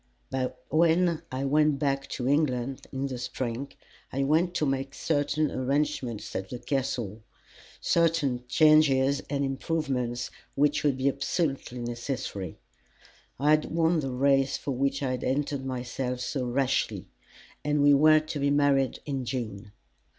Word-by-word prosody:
But 130 -1 -2
when 165 +1 +3
I 130 +1 -2
went 150 +1 +3
back 135 -1 -1
to 125 - -3
England 135 -3 0
in 135 0 -2
the 130 -3 -4
spring, 125 +1 -4 0.4
I 135 +1 0
went 165 +5 +2
to 155 - +1
make 135 0 -2
certain 150 0 0
arrangements 130 -3 -2
at 95 0 -3
the 125 - -5
Castle 120 -6 -2 0.6
certain 160 -7 +1
changes 140 -1 +4
and 140 -1 0
improvements 135 -4 -2 0.2
which 145 +1 +2
would 140 -3 +2
be 130 +1 0
absolutely 135 -4 -1
necessary. 120 - -4 0.8
I 145 +2 +3
had 155 0 +4
won 165 0 +2
the 135 -3 -2
race 135 +1 +2
for 140 - -4
which 140 +2 0
I 130 - 0
had 125 - -3
entered 140 0 -1
myself 125 0 -3
so 130 0 -2
rashly, 135 +2 0 0.6
and 150 -1 +1
we 145 0 +7
were 155 +2 +6
to 155 -1 -5
be 140 0 +2
married 140 -2 +2
in 135 -3 -2
June. 110 -6 -5
135 Hz, 145 wpm, -28 LUFS, 125-150 Hz, 0.8 s, we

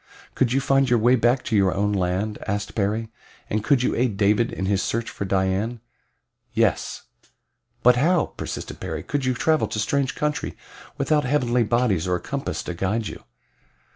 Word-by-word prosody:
"Could 125 -3 +1
you 135 - +3
find 135 -1 +2
your 120 - +4
way 120 +3 +4
back 120 +1 +2
to 110 - -1
your 95 -3 +3
own 100 +1 +1
land?" 95 +3 -1
asked 100 +1 -2
Perry. 110 +2 -1 0.4
"And 105 0 0
could 135 -2 +3
you - - +1
aid 120 -4 0
David 105 +3 +2
in 95 - -3
his 95 0 +1
search 115 0 -2
for 100 - -4
Dian?" 95 +5 0 0.7
"Yes." - - 0 0.8
"But 125 0 +6
how," 170 +5 +3
persisted - - -6
Perry, - - -4
"could 145 -2 -2
you 130 -1 +1
travel 155 +6 +2
to - - -5
strange 135 +6 0
country 150 0 -2 0.4
without 145 +1 +1
heavenly 125 -3 +2
bodies 110 -6 +1
or 90 - +1
a - - -2
compass 140 0 -4
to 90 - -4
guide 100 +6 -1
you?" - - -10
115 Hz, 180 wpm, -24 LUFS, 100-130 Hz, 0.8 s, But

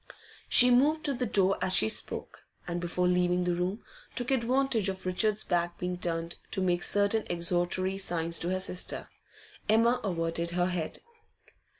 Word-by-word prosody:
She 250 0 +7
moved 300 +6 +3
to 285 - +2
the 250 -1 -2
door 195 -2 +2
as 185 - +1
she 110 - +3
spoke, - - -3 0.2
and, 175 0 -3
before 180 +1 0
leaving 180 0 +2
the 175 0 0
room, 180 +5 -2 0.3
took 245 +2 -2
advantage 255 -4 +1
of 190 -1 -6
Richard's 210 +3 0
back 175 -1 -1
being 180 0 -4
turned 165 -1 -3
to 190 - +1
make 175 -1 +1
certain 205 +3 +1
exhortatory 175 +2 -1
signs 170 -3 0
to 175 - -2
her 185 0 -1
sister. 180 -1 -1 0.6
Emma 230 +3 +4
averted 170 -3 -1
her 175 - +3
head. 175 -3 -4
185 Hz, 165 wpm, -29 LUFS, 175-215 Hz, 0.6 s, She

